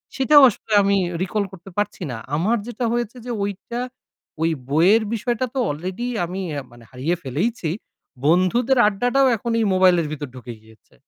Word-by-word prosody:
সেটাও 290 +2 +6
আসলে 215 0 -6
আমি 200 0 +3 0.2
recall 200 +3 0
করতে 190 0 -12
পারছি 205 -1 -2
না। 120 - -5 0.2
আমার 205 +10 +1
যেটা 240 0 -3
হয়েছে 240 0 -2
যে, 245 - -4
ঐটা 205 +4 -4 0.6
ওই 165 +1 +2 0.2
বইয়ের 180 +10 +4
বিষয়টা 235 +2 -1
তো 270 - -2
অলরেডি 185 +10 -4 0.2
আমি 185 +3 -5 0.3
মানে 120 0 -16
হারিয়ে 135 +7 -1
ফেলেইছি। 160 - -2 0.6
বন্ধুদের 185 - +3
আড্ডাটাও 245 +6 +2
এখন 235 +3 -4
এই 225 - +2
মোবাইলের 180 -3 +4
ভিতর 145 -1 -5
ঢুকে 125 -1 -8
গিয়েছে। 110 -1 -22
195 Hz, 155 wpm, -22 LUFS, 165-235 Hz, 0.6 s, সেটাও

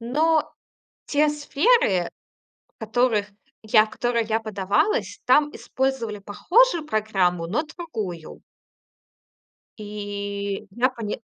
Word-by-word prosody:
но 305 +7 +1 0.6
те 300 +1 +2
сферы, 290 - +2 0.7
в - - -76
которых 220 -2 +1 0.4
я 215 0 +5
в - - -13
которые 235 0 -1
я 220 0 0
подавалась, 215 - 0
там 295 0 +4
использовали 260 -6 -2
похожую 340 - +2
программу, 190 - 0
но 225 - 0
другую. 220 - -7 1.4
И 205 -1 -5
я 250 +2 +3
поня 230 -5 -5
220 Hz, 100 wpm, -24 LUFS, 205-290 Hz, 1.4 s, я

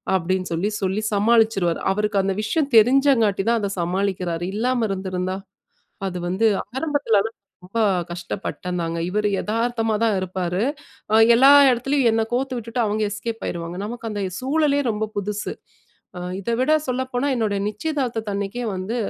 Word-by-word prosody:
அப்பிடின்னு 185 0 -1
சொல்லி, 195 +6 -1
சொல்லி 195 +3 0
சமாளிச்சுருவாரு. 210 -5 +2
அவருக்கு 210 0 0
அந்த 195 -1 0
விஷயம் 285 +4 0
தெரிஞ்சங்காட்டி 230 -4 +4
தான் 235 - +2
அத 200 - -2
சமாளிக்கிறாரு. 180 -1 -1
இல்லாம 240 0 +1
இருந்திருந்தா! 185 -1 -3 0.7
அது 180 -1 -4
வந்து 190 +5 +1 0.3
ஆரம்பத்தில 285 -7 +1 0.5
ரொம்ப 195 +6 -4 0.3
கஷ்டப்பட்டேன்ந்தாங்க. 175 -1 -4
இவரு 210 +1 0
எதார்த்தமா 225 0 0
தான் 220 -3 +3
இருப்பாரு. 185 0 -2 0.5
அ - - +6 0.2
எல்லா 270 +3 +7 0.2
இடத்துலயும் 255 +1 +2
என்ன 225 - +1
கோர்த்து 255 +1 -1
விட்டுட்டு, 235 +1 -3
அவுங்க 215 +1 0
எஸ்கேப் 225 +2 -5
ஆயிருவாங்க. 170 0 -5
நமக்கு 230 0 -5
அந்த 205 -1 -3 0.2
சூழலே 285 +1 +1
ரொம்ப 215 +1 -2
புதுசு. 210 +1 -3 0.6
அ - - -5 0.2
இத 200 +4 -3
விட 260 +4 +2 0.2
சொல்லப்போனா 255 +1 -1
என்னுடைய 210 -4 0
நிச்சயதார்த்தத 235 -2 -3
அன்னக்கே 200 +5 -3
வந்து 185 +5 -4
215 Hz, 140 wpm, -22 LUFS, 190-240 Hz, 0.7 s, எல்லா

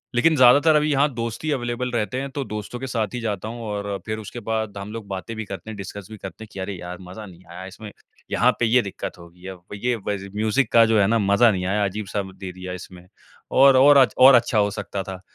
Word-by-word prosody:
लेकिन 160 +7 +4
ज़्यादातर 140 +4 +6
अभी 150 0 +2
यहाँ 145 0 +2
दोस्त 115 +1 -5
ही 155 - -1
अवेलेबल 125 -2 -2
रहते 120 +2 -2
हैं 140 - -5
तो 140 +1 -3
दोस्तों 105 +2 -6
के 130 - -5
साथ 115 -4 -1
ही 125 - -3
जाता 105 -2 -3
हूँ 120 +1 -7
और 100 -1 -3
फिर 110 0 -3
उसके 110 +3 -8
बाद 110 -2 -3
हम 100 +1 -7
लोग 115 -3 -7
बातें 100 +4 -6
भी 110 0 -5
करते 95 +1 -8
हैं, 110 - -6
डिस्कस 100 0 -8
भी 110 - -8
करते 95 +2 -9
हैं 110 - -13
कि, 95 - -8
"अरे 95 +2 -4
यार, 90 +1 -7
मज़ा 95 +4 -9
नहीं 90 -2 -15
आया 90 +2 -8
इसमें। 105 +2 -10 0.4
यहाँ 125 +2 +4
पे 120 - +2
ये 120 +2 +4
दिक्कत 100 -3 -7
होगी 85 +1 -14
अब, 95 -2 -9
ये 120 +4 -1
व 105 -2 -3
ज़ 100 0 -9
म्यूज़िक 110 +4 0
का 115 -1 +6
जो 110 -1 +3
है 100 - +4
ना 115 +2 +2
मज़ा 100 +3 +4
नहीं 90 -2 -2
आया 100 +2 0
अजीब-सा 100 +1 -3
दे 95 -1 -7
दिया 90 0 -7
इसमें, 90 -1 -11 0.4
और 135 0 +6
और 140 +2 +7
अच् 130 -6 +5
और 130 +1 +8
अच्छा 120 -1 +2
हो 105 -1 +2
सकता 100 -1 -5
था।" 95 -2 -8
110 Hz, 260 wpm, -23 LUFS, 95-120 Hz, 0.4 s, और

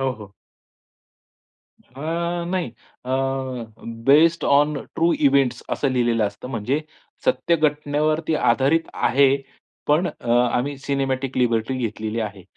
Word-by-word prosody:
हो, 135 -1 +1
हो. 105 -4 -12 1.5
अ, 170 +6 -3
नाही, 180 -7 -1 0.4
अ, - - -4 1.0
बेस्ड 160 +4 +5
ओन 145 +2 +3 0.2
ट्रू 170 +1 +2 0.2
इव्हेंट्स 135 -2 +1
असं 140 - 0
लिहिलेलं 120 -3 +1
असतं. 105 +5 -8
म्हणजे 125 +6 -1 0.4
सत्य 130 +7 +2
घटनेवरती 155 +1 0
आधारित 150 +3 +2
आहे. 135 +1 +3 0.5
पण 155 +5 +3 0.2
आम्ही 125 +3 +2
अ, - - -12
सिनेमॅटिक 135 -1 -1
लिबर्टी 120 0 +1
घेतलेली 110 -1 -3
आहे. 100 -3 -5
135 Hz, 115 wpm, -22 LUFS, 120-155 Hz, 1.5 s, बेस्ड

